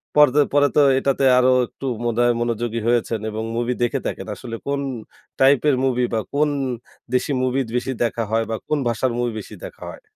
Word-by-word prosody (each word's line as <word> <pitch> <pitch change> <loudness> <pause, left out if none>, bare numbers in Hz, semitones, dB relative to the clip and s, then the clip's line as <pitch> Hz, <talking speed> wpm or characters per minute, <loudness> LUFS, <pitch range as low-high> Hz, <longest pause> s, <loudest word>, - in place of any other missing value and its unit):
পরতে 150 -1 +6
পরে 145 0 +5
তো 150 - +6 0.2
এটাতে 135 0 +1
আরো 125 0 +4 0.2
একটু 135 - -10 0.2
মনে 120 0 -1
হয় 120 0 +4
মনোযোগী 115 0 -2
হয়েছেন 120 -1 +1
এবং 110 +1 -4
মুভি 120 +1 0
দেখে 120 - 0
থাকেন। - - -5
আসলে 115 -2 -7
কোন 140 0 -1 0.6
টাইপের 140 +1 +4
মুভি 125 -1 +1
বা 110 - +1
কোন 150 +1 +2 0.6
দেশি 125 +3 +1
মুভি 130 +1 0 0.2
বেশি 125 +2 -1
দেখা 115 0 -1
হয় 115 0 +2
বা 110 - -1
কোন 150 - +1
ভাষার 120 +2 0
মুভি 120 -1 0
বেশি 105 - -10
দেখা - - -9
হয়? - - -11
125 Hz, 190 wpm, -21 LUFS, 115-140 Hz, 0.6 s, পরতে